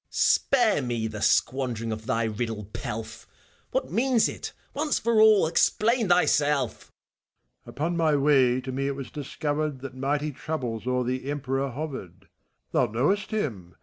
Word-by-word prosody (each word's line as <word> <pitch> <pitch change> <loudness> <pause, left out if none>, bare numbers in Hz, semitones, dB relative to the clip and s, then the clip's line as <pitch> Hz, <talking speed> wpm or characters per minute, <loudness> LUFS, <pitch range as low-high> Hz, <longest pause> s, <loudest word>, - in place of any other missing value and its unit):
Spare 240 - +3
me 120 -3 -2
the 110 -1 -5
squandering 120 -4 +1
of 110 +1 -6
thy 115 -3 +1
riddle 110 -1 -3
pelf 110 +1 -6
I - - -35 0.3
What - - -2
means 245 -1 +3
it, - - -6 0.2
once 300 +1 0
for 230 -2 +2
all 215 -4 +6
f 160 - -2
Explain 230 +2 +2
thyself! 145 -7 +2
MKPHISTOPHELES. - - -39
Upon 165 +4 -2
my 160 -3 +3
way, 135 -3 +3
to 130 +1 -5
me 135 +1 -2
it 140 - -2
was 135 -2 -7
discoiwred 145 0 -3
That 135 -2 -7
mighty 145 +3 -1
troubles 125 -5 -4
o'er 125 0 +1
the 130 +2 -3
Emperor 135 -1 -2
horered: 130 - -7 0.5
Thou 125 - +2
knowest 150 - 0
him. 105 - -3
135 Hz, 160 wpm, -26 LUFS, 120-160 Hz, 0.5 s, all